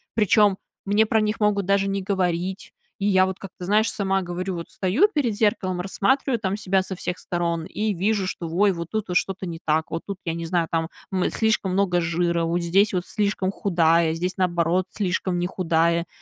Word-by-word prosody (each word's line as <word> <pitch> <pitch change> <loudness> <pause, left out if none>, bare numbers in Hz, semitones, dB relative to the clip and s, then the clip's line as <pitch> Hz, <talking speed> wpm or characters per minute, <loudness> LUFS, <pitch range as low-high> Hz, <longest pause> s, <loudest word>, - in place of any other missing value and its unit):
Причем 210 -2 +4 0.3
мне 205 +2 +3
про 220 0 +2
них 215 +1 -1
могут 205 -2 +1
даже 195 +1 +2
не 195 0 -1
говорить. 185 -1 -2 0.3
И 200 - -1
я 190 -2 +4
вот, 190 0 -4
как 195 - -9
ты - - -8
знаешь, 215 +4 +3
сама 195 -1 0
говорю: 180 +1 -4
вот 170 -1 -7
стою 205 - +2
перед 255 -7 +1
зеркалом, 205 -4 0
рассматриваю 240 +8 +1
там 200 -2 -2
себя 190 -2 +1
со 190 0 -5
всех 180 0 -4
сторон 170 -2 -2
и 210 +3 -2
вижу, 195 +1 0
что, 175 -2 -4
ой, 195 +4 +3
вот 170 -1 -6
тут 215 -1 -1
что-то 190 +1 -1
не 165 -2 -6
так, 155 +1 0
вот 165 - -3
тут, 200 -2 -5
я 165 - -1
не 165 0 -4
знаю, 170 0 0
там, 165 0 -1 0.2
м, 185 -1 +1
слишком 220 -4 +1
много 180 -2 +2
жира, 170 0 0
вот 165 +1 0
здесь 190 +5 +2
вот 180 -1 -1
слишком 200 -3 -1
худая, 170 -4 +2
здесь, 180 +2 -2
наоборот, 175 0 +1
слишком 185 -2 -1
не 175 - 0
худая. 170 -2 +1
185 Hz, 205 wpm, -24 LUFS, 170-200 Hz, 0.3 s, Причем